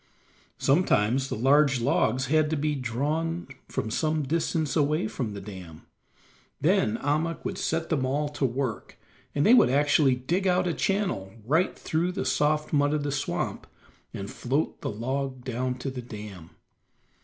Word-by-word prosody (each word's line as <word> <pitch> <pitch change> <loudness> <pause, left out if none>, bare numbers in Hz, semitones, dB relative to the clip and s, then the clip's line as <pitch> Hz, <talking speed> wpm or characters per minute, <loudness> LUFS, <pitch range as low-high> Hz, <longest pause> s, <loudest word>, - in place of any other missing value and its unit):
Sometimes 135 - +2
the - - -2
large 140 +3 +4
logs 130 0 +1
had 155 +2 +2
to 160 - 0
be 150 +1 0
drawn 150 +7 -2 0.2
from 110 - -3
some 155 +4 0
distance 160 0 -1
away 150 -5 +2
from 110 -3 -4
the - - -5
dam; 90 -6 -10 0.7
then 110 +1 +2
Ahmuk 155 +5 -1
would - - -3
set 165 0 -1
them 150 -5 +1
all 140 +3 0
to 145 -1 -5
work, 130 -2 -2 0.4
and 145 - +2
they 230 - +7
would 250 - +6
actually 145 0 +4
dig 170 +10 -1
out 180 0 +3
a 175 - 0
channel 185 - -1
right 160 +9 +1
through 170 +3 -1
the - - -3
soft 150 +1 +1
mud 145 0 +3
of 150 - -1
the 145 - -1
swamp, 135 -11 -3 0.4
and 100 +1 -6
float 135 +5 -2
the - - -2
log 130 +4 -3
down 125 0 -2
to 135 +2 -4
the 130 -1 -6
dam. 105 -7 -9
140 Hz, 165 wpm, -27 LUFS, 125-155 Hz, 0.7 s, they